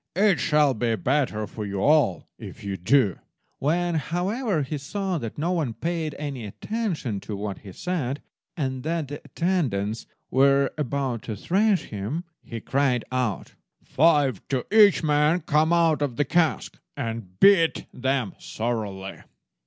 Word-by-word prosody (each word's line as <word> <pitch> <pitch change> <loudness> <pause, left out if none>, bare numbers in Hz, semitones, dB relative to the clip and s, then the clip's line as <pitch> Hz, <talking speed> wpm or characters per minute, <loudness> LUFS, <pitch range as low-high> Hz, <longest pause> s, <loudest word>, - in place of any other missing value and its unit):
It 195 0 +4
shall 150 -3 +3
be 115 -1 0
better 115 0 0
for 105 - -7
you 100 -1 -3
all 145 - +3
if - - -10
you 100 -1 -3
do!" 95 +2 +2 0.4
When, 175 +4 +1
however, 180 - -1
he 145 +2 -4
saw 185 +5 -2
that 115 -4 -6
no 165 +4 0
one 150 -10 -1
paid 165 +3 -2
any 140 -5 -5
attention 165 - -3
to 105 - -6
what 100 0 -4
he 100 - -11
said, 150 - -3 0.4
and 130 -4 -2
that 160 -1 -2
the 145 - -6
attendants 120 - -1 0.2
were 140 +1 +4
about 135 -5 -2
to 110 - -2
thrash 195 - +2
him, 110 - -4 0.2
he 115 - -7
cried 130 0 +1
out— 125 -6 -2 0.3
"Five 145 - +3
to 130 -3 -1
each 205 -5 +7
man 150 +3 +3
come 155 +1 +2
out 165 -3 +3
of 140 -5 -1
the 145 - +1
cask, 165 +2 0 0.2
and 110 -5 -5
beat 185 -5 +5
them 130 -3 -1
thoroughly!" 105 -4 -4
140 Hz, 150 wpm, -25 LUFS, 115-165 Hz, 0.4 s, each